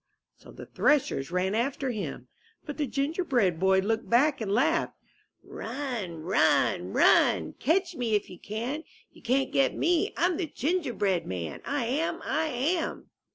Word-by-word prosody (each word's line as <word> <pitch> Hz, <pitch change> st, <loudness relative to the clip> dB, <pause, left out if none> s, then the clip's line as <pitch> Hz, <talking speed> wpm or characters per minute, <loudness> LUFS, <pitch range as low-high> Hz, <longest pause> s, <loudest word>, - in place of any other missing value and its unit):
'' -, -, -59 dB
So -, -, -15 dB
the -, -, -10 dB
threshers 270 Hz, -, +1 dB
ran 180 Hz, +2 st, 0 dB
after 260 Hz, +3 st, -1 dB
him. 215 Hz, -4 st, -5 dB, 0.4 s
But 295 Hz, -, -6 dB
the 295 Hz, -2 st, -1 dB
Gingerbread 275 Hz, -, 0 dB
Boy 190 Hz, +1 st, +4 dB
looked 225 Hz, +4 st, -2 dB
back 275 Hz, +3 st, +3 dB
and 205 Hz, -3 st, -2 dB
laughed: 230 Hz, +6 st, +1 dB, 0.5 s
*^Run! 225 Hz, -, -5 dB
Run! 185 Hz, +4 st, +2 dB
Run! -, -, +4 dB
Catch 350 Hz, +2 st, +1 dB
me 235 Hz, -5 st, 0 dB
if 205 Hz, -, 0 dB
you 180 Hz, -, -12 dB
can! 240 Hz, +9 st, -4 dB, 0.3 s
You -, -, -18 dB
can't 265 Hz, +2 st, +1 dB
get 275 Hz, -, +2 dB
me! 350 Hz, +4 st, +1 dB
I'm 350 Hz, -1 st, +2 dB
the 350 Hz, -, -2 dB
Gingerbread 245 Hz, -, -1 dB
Man, 85 Hz, -5 st, -5 dB
lam! 285 Hz, +5 st, -1 dB
I 315 Hz, +3 st, 0 dB
am!" 310 Hz, +6 st, -2 dB
255 Hz, 155 wpm, -28 LUFS, 205-305 Hz, 0.5 s, Boy